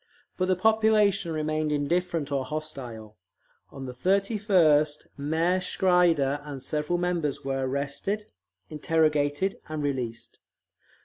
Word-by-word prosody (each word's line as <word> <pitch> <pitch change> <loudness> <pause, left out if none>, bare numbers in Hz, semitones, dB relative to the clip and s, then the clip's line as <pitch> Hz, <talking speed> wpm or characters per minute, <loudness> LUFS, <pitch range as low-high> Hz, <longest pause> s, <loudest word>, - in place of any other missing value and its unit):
But 185 - 0
the 185 - +3
population 215 -3 +3
remained 155 0 -1
indifferent 160 +1 -1
or 135 -2 0
hostile. 130 -7 -7 0.5
On 135 -1 -8
the 130 - -5
31st 180 - +2
Mayor 160 +6 +1
Schreider 170 -7 +2
and 140 -3 -7
several 150 +3 -1
members 175 -6 -1
were 135 -1 -1
arrested, 140 +10 -2 0.4
interrogated, 155 +2 +1
and 155 -1 -3
released. 125 -5 -4
155 Hz, 110 wpm, -27 LUFS, 140-180 Hz, 0.5 s, the